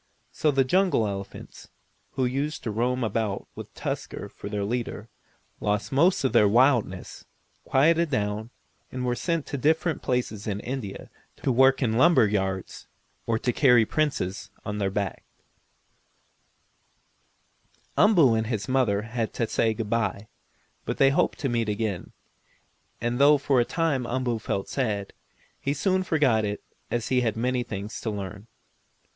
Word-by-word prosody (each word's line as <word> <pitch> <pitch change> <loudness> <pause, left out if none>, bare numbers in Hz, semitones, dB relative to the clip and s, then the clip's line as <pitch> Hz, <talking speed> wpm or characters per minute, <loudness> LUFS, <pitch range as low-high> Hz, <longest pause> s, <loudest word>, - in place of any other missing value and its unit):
So 155 - +1
the 135 -2 +3
jungle 180 - +2
elephants, 100 -1 -7 0.5
who 130 - 0
used 140 +4 -2
to 110 - -2
roam 125 +4 0
about 110 -2 -2
with - - -9
Tusker - - -5
for 100 - -9
their 105 -1 -2
leader, 115 0 -3 0.5
lost 105 +1 -1
most 165 +5 +3
of 130 - +1
their 105 -3 +6
wildness, 115 -4 +2 0.4
quieted 165 +4 +3
down, 105 -3 -2 0.4
and 125 -1 -3
were 125 - +1
sent 165 +4 -1
to 140 - -4
different 160 +3 +1
places 125 -5 -2
in 100 -1 -2
India 125 -6 -6 0.3
to 135 - +2
work 130 +2 +4
in 115 - +1
the 110 - 0
lumber 170 -6 +6
yards, 95 -2 -3 0.4
or 115 - +2
to 125 +2 -1
carry 125 -5 +5
Princes 135 -10 -1 0.2
on 105 0 -3
their 100 -1 +1
backs. 100 0 -3 2.7
Umboo 170 - +5
and 110 0 0
his 110 -2 -2
mother 125 -6 +1
had 115 0 -3
to 115 - 0
say 115 - +1
good 110 -2 -4
bye, 105 -2 -1 0.6
but - - -3
they 135 0 +5
hoped - - +1
to 140 - 0
meet 115 -3 0
again, 105 -3 -3 0.9
and 120 +2 -1
though 145 +1 +7
for 135 -2 +2
a 120 - +3
time 150 -7 0
Umboo 120 -2 -1
felt 100 -2 -3
sad, 105 -7 -2 0.5
he 140 +1 -1
soon 185 +6 +1
forgot 145 -11 +2
it 105 0 -3 0.3
as 120 -1 -2
he 125 -1 +3
had 110 -3 -1
many 125 +2 0
things 105 -2 -6
to 115 - -2
learn. 100 +1 -6
120 Hz, 155 wpm, -26 LUFS, 105-135 Hz, 2.7 s, though